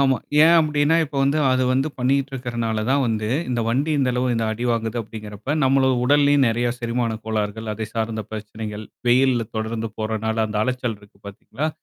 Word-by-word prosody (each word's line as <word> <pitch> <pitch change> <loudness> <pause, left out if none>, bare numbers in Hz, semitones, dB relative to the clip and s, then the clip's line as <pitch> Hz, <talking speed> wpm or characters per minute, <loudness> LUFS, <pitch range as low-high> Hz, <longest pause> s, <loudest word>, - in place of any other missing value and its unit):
ஆமா. 135 -2 +3 0.3
ஏன் 165 +2 +6
அப்படின்னா 150 0 +2
இப்ப 145 -2 -8
வந்து, 140 +3 +2
அது 130 0 +2
வந்து 135 +4 +1
பண்ணிட்டு 135 +2 +1
இருக்கனாலதான் 120 +1 -1
வந்து, 110 -2 -1 0.2
இந்த 120 -2 0
வண்டி, 135 +7 0
இந்த 130 -2 +2
அளவு 125 +1 0
இந்த 115 -1 0
அடி 115 +3 -4
வாங்குது 115 0 -2
அப்படிங்கறப்ப 105 +5 -5
நம்ம 135 0 +3
உடல்லயும் 145 0 +4
நெறைய 120 +1 0
செரிமான 115 -1 -1
கோளாறுகள் 110 0 -2
அதை 110 +1 -4
சார்ந்த 110 -1 -2
பிரச்சனைகள், 110 0 -6 0.2
வெயில்ல 125 -2 +3
தொடர்ந்து 110 0 -3
போறனால 110 0 -1
அந்த 105 -1 -3
அலைச்சல் 125 -3 -2
இருக்கு 100 -1 -20
பாத்தீங்களா? 110 +8 -4
115 Hz, 170 wpm, -22 LUFS, 110-135 Hz, 0.3 s, ஏன்